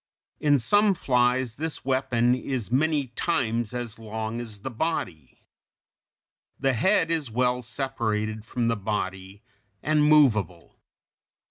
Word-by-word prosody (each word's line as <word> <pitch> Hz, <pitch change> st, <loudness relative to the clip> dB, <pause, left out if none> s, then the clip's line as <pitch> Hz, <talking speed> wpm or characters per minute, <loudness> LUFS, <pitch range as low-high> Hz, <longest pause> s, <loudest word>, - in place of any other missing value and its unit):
In 145 Hz, -1 st, +4 dB
some 205 Hz, -, +3 dB
flies 125 Hz, -4 st, +1 dB
this 160 Hz, -1 st, -4 dB
weapon 125 Hz, -2 st, +2 dB
is 125 Hz, -3 st, -3 dB
many 145 Hz, 0 st, +1 dB
times 120 Hz, -5 st, -1 dB
as 120 Hz, -3 st, -5 dB
long 110 Hz, +1 st, -4 dB
as 110 Hz, -4 st, -8 dB
the 130 Hz, -, -5 dB
body. 100 Hz, -, -4 dB, 1.2 s
The 135 Hz, -1 st, +2 dB
head 165 Hz, -, +2 dB
is 155 Hz, -6 st, -1 dB
well 125 Hz, +2 st, 0 dB
separated 110 Hz, -3 st, -2 dB
from 120 Hz, +1 st, -2 dB
the 115 Hz, -, +1 dB
body, 95 Hz, -1 st, -4 dB, 0.4 s
and 150 Hz, 0 st, +2 dB
movable. 110 Hz, -, +3 dB
125 Hz, 120 wpm, -26 LUFS, 110-140 Hz, 1.2 s, In